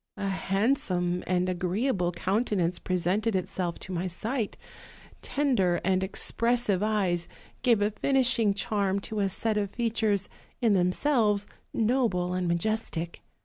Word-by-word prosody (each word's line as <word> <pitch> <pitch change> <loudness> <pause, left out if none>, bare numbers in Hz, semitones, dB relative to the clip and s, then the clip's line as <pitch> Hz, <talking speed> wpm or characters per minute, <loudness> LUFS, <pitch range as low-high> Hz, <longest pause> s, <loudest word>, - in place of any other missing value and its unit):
A 200 -1 -2
handsome 190 -3 0
and 180 0 +1
agreeable 185 +2 0
countenance 190 -2 0
presented 190 +5 0
itself 180 -1 -2
to 190 - -7
my 180 +1 -1
sight; 220 +5 -3 0.6
tender 240 -12 +1
and 190 0 +2
ex 190 - 0
pressive 230 -5 +2
eyes 195 -5 0 0.3
gave 235 -5 +3
a 210 - +1
finishing 250 -3 +2
charm 200 -1 0
to 215 +2 -4
a 200 -1 +2
set 215 +3 -1
of 200 -1 -1
features 220 -3 0 0.3
in 230 -4 +3
themselves 205 +3 +2 0.3
noble 220 -7 +1
and 180 -1 -1
majestic. 170 -1 -2
200 Hz, 130 wpm, -28 LUFS, 180-225 Hz, 0.6 s, gave